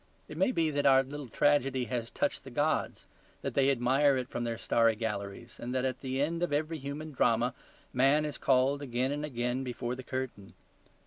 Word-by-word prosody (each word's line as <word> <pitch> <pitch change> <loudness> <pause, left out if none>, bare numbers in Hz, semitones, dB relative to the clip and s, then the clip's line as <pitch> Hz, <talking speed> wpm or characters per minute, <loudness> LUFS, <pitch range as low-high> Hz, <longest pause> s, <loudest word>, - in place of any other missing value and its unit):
It - - -9
may 285 -2 +2
be 165 -9 +1
that 145 -1 +1
our 135 -1 +6
little 140 +1 -7
tragedy 135 -1 +2
has 120 0 -3
touched - - -1
the - - -9
gods, - - -1 0.4
that - - -2
they 140 -1 +3
admire 135 +2 +3
it 125 -1 -3
from 120 - -3
their 115 -1 -2
starry 115 -1 +3
galleries, 105 0 -5
and 125 +2 -4
that 130 0 +1
at 130 -1 -2
the 130 0 -2
end 165 +4 0
of 175 - 0
every 155 +2 -1
human 145 +3 -6
drama 120 -2 +2 0.4
man 135 +4 +4
is 150 - -4
called 135 +2 +3
again 130 0 -1
and 145 +1 -3
again 125 -2 -2
before 125 -1 -3
the 130 - -6
curtain. 130 -6 -5
130 Hz, 200 wpm, -31 LUFS, 120-145 Hz, 0.4 s, our